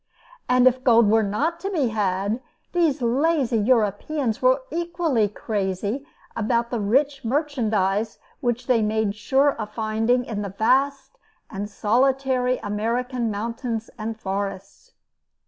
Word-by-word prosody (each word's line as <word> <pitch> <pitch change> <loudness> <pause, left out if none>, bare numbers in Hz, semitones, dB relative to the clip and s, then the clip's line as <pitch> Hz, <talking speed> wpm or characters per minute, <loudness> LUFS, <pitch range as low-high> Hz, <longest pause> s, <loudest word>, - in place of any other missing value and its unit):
And 250 0 +4
if 255 0 +3
gold 230 -4 +5
were 225 0 +5
not 275 +12 -1
to 390 - -3
be 305 -11 0
had, 205 +1 -1 0.3
these 320 -6 +1
lazy 260 -1 +2
Europeans 225 +3 0
were - - +3
equally 335 -9 0
crazy 205 +5 -3 0.3
about 235 +1 0
the 240 - -1
rich 270 +7 +1
merchandise 225 -6 0 0.2
which 240 0 -1
they 245 -3 +3
made 215 -1 0
sure 270 +7 +2
of 210 -1 -6
finding 225 +3 +1
in 215 -4 -4
the 200 - -4
vast 275 - +1 0.3
and 205 0 -4
solitary 255 +4 +1
American 230 +3 -1
mountains 230 +2 -4
and 220 +1 -4
forests. 195 -1 -5
235 Hz, 130 wpm, -23 LUFS, 210-270 Hz, 0.3 s, gold